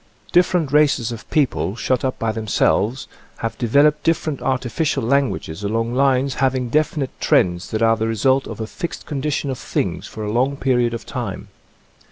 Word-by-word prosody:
Different 175 -4 +3
races 140 -6 +3
of 115 -1 -8
people, 115 - 0
shut 125 +2 0
up 130 -1 -1
by 115 -1 -1
themselves, 110 +2 0 0.3
have 115 - -3
developed 145 +5 +3
different 155 -3 0
artificial 130 +2 -1
languages 120 - 0
along 115 +3 -1
lines 135 0 +2
having 130 -2 +1
definite 150 -1 0
trends 90 0 +2
that 110 +1 -1
are 115 0 +4
the 110 0 -1
result 130 +5 +2
of - - -7
a 110 - -2
fixed 170 - -6
condition 145 -1 -2
of 130 - -5
things - - -2
for 110 - -7
a 105 - -2
long 130 +5 +1
period 125 -3 +1
of 115 - -7
time. - - -5
130 Hz, 170 wpm, -20 LUFS, 115-140 Hz, 0.3 s, are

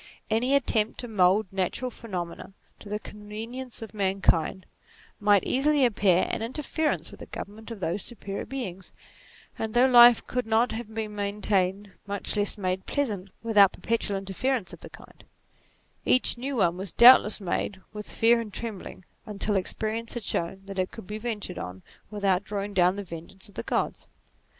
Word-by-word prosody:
Any 250 +5 +3
attempt 225 -5 +1
to 245 - -6
mould 195 -1 +2
natural 195 +7 -1
phenomena 185 -5 -6 0.3
to 205 - -11
the 210 - -1
convenience 225 +5 -8
of 225 - -10
mankind 190 -3 +1 0.5
might 205 -2 +4
easily 285 +1 +3
appear 200 -6 +3
an - - -3
interference 300 +6 -2
with - - -13
the - - -9
government 215 +3 -8
of 225 -4 -8
those 180 +4 -1
superior 200 -3 -6
beings: 195 -9 -6 0.7
and 220 0 -3
though 245 +2 +6
life 240 -2 +8
could 250 -2 -2
not 225 +2 +3
have 220 -1 -6
been 215 -1 -3
maintained, 200 -1 0 0.2
much 200 -1 -2
less 205 +1 +1
made 185 -1 -2
pleasant, 210 -10 -2
without 210 -4 +5
perpetual 225 -3 -1
interferences 195 +2 -2
of - - -10
the - - -10
kind, - - -15 0.8
each 255 - +3
new 265 +3 -4
one 175 -6 +2
was 190 -1 -5
doubtless 235 -3 +8
made 190 0 -2
with 210 -1 -6
fear 230 +1 +4
and 215 -3 -8
trembling, 205 -5 -7 0.2
until 210 0 -2
experience 220 +5 -2
had 240 - -4
shown 190 +1 -3
that 195 -1 -6
it 185 - 0
could 225 - -11
be 210 +3 -6
ventured 215 -5 -4
on 90 +1 -7 0.3
without 200 -2 +1
drawing 205 0 -4
down 180 0 +4
the 200 - -5
vengeance 170 +4 -9
of - - -18
the - - -4
Gods. - - -2
210 Hz, 170 wpm, -27 LUFS, 195-230 Hz, 0.8 s, life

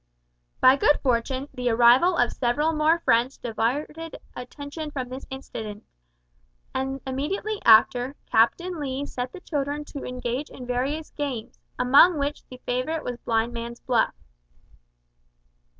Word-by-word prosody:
By 260 +2 +6
good 295 +1 +3
fortune, 260 +2 0
the 250 -2 -1
arrival 245 +10 +5
of 245 - +3
several 295 +6 0
more 310 +2 +3
friends 240 +2 +2
diverted 290 +8 -3 0.2
attention 285 +5 -7
from 260 -4 -5
this 260 +1 -8
incident; 220 -6 -7 0.9
and, 270 +1 -2
immediately 375 +11 -3
after, 245 +4 +5
Captain 340 +10 +2
Lee 275 -1 -3
set 250 -2 -5
the 360 - -10
children 290 -1 -3
to 285 -2 -8
engage 250 +3 -4
in 250 - -9
various 270 +6 -2
games, 270 -7 -5 0.2
among 285 +7 +6
which 285 +1 -2
the 255 - -10
favourite 255 +6 -1
was 245 -1 -5
blindman's 235 +1 -2
buff. 240 -3 +1
265 Hz, 130 wpm, -25 LUFS, 245-295 Hz, 0.9 s, By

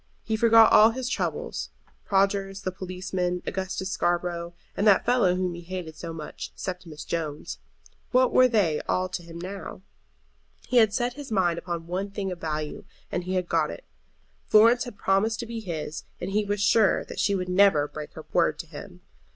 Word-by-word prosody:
He 220 - -1
forgot 225 0 +6
all 215 +1 +8
his 250 +2 -4
troubles. - - -3 0.4
Prodgers, 195 0 +1
the 185 - -1
policeman, 185 -1 -3
Augustus 190 0 -3
Scarborough, 175 -1 -1 0.2
and 205 - +1
that 200 -2 +5
fellow 235 -8 +3
whom 180 -1 -1
he 170 - -8
hated 175 -2 -6
so 165 0 -7
much, 155 -2 -7
Septimus 180 -5 -6
Jones; 155 -3 -4 0.5
what 255 0 +3
were 255 - +7
they 200 -11 +1
all 185 0 +1
to 180 - -4
him 170 -1 -10
now? 185 +1 -7 0.8
He 250 - +1
had 220 -3 +6
set 240 +3 -1
his 280 -2 -9
mind 175 -5 +2
upon 170 -2 -5
one 185 +4 -3
thing 195 -1 -4
of 175 - -7
value, 155 -1 -3 0.3
and 175 - -2
he 185 +1 -2
had 180 -1 0
got - - +1
it. - - -8 0.6
Florence 230 +3 +6
had 240 -4 -9
promised 215 +4 +1
to - - -5
be 230 0 -5
his, 160 -6 -5 0.2
and 180 +2 -4
he 210 +1 +1
was 205 0 -1
sure 205 0 +3
that - - -8
she 200 - +2
would 180 -1 -2
never 180 -5 +4
break 150 0 -8
her 160 - -10
word 165 -3 +3
to 165 - -6
him. 145 - -11
185 Hz, 190 wpm, -26 LUFS, 170-210 Hz, 0.8 s, all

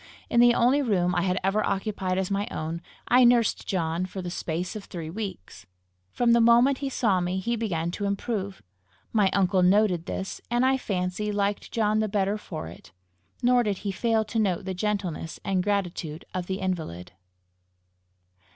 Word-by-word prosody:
In 235 - +4
the 240 0 +6
only 255 +5 +4
room 185 -8 +1
I 175 - +1
had 185 0 0
ever 200 +3 +1
occupied 195 -2 -1
as 190 0 -1
my 200 +1 0
own, 160 +2 -4 0.3
I 250 +1 +6
nursed 240 -2 +3
John 170 -1 -1
for 190 - -12
a 180 -2 -4
space 175 +4 -3
of 210 - -7
three 165 -3 -6
weeks. 165 - -7 0.4
From 240 -1 +2
the 235 0 +5
moment 240 +4 +5
he 275 - -2
saw 210 -8 +1
me, 180 +1 -1
he 235 +6 -1
began 170 -7 -2
to 205 +3 -4
improve. 200 -1 -3 0.5
My 210 -4 +4
uncle 190 -1 +2
noted 180 -2 +3
this, 190 - -4
and 240 +2 +2
I 265 +1 +4
fancy 195 -3 -2
liked 205 0 -1
John 215 -1 +1
the 215 - +1
better 200 +1 0
for 160 -6 -6
it. 85 - -13 0.5
Nor 245 0 +5
did 205 -4 -1
he 200 - 0
fail 220 +2 +1
to 225 +2 -2
note 185 -5 0
the 190 - -3
gentleness 185 -5 -3
and 190 -2 +1
gratitude 180 -5 -2
of 180 -1 -3
the 190 0 -3
invalid. 160 - -4
195 Hz, 180 wpm, -26 LUFS, 180-220 Hz, 0.5 s, the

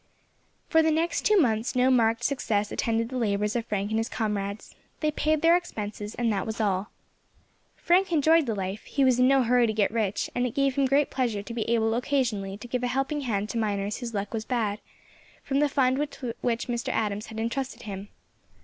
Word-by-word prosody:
For 320 - +4
the 320 - +2
next 325 +2 +1
two 425 -1 +4
months 235 - +1
no 255 +1 +4
marked 230 -1 +2
success 215 -6 0
attended 230 0 0
the 260 - -4
labours 210 -1 0
of 235 -1 -2
Frank 205 0 -2
and 220 - +1
his 225 +3 -2
comrades, 205 -3 -3 0.3
they 305 -1 +1
paid 310 +1 0
their 335 +1 +6
expenses, 210 -11 -4
and 235 -2 +1
that 195 0 -2
was 220 +1 -4
all. 200 -1 0 0.9
Frank 365 +2 +2
enjoyed 320 -1 +4
the 225 - -1
life; 195 +1 -4
he 275 - 0
was 255 -2 +4
in 250 - +5
no 270 -1 +4
hurry 245 0 +3
to 220 - -1
get 210 -2 +1
rich, 215 -3 -1
and 245 0 0
it 235 - -7
gave 275 -1 +2
him 275 0 +2
great 280 +2 +2
pleasure 235 -6 -1
to 230 - -7
be 230 -1 -3
able 225 -1 +2
occasionally 235 -6 -1
to 220 - -10
give 250 +1 -2
a 250 - 0
helping 270 +4 -1
hand 210 -6 -1
to 235 - -2
miners 205 -1 -1
whose 235 -3 -6
luck 200 +2 -3
was 220 -1 -2
bad, 215 -4 -1 0.6
from 275 0 0
the 295 0 +3
fund 265 -1 +2
with 270 -5 -4
which 235 -1 0
Mr. 240 -1 -2
Adams 210 0 -1
had 220 -1 -7
intrusted 250 +4 -3
him. 200 -2 -6
235 Hz, 215 wpm, -27 LUFS, 210-270 Hz, 0.9 s, their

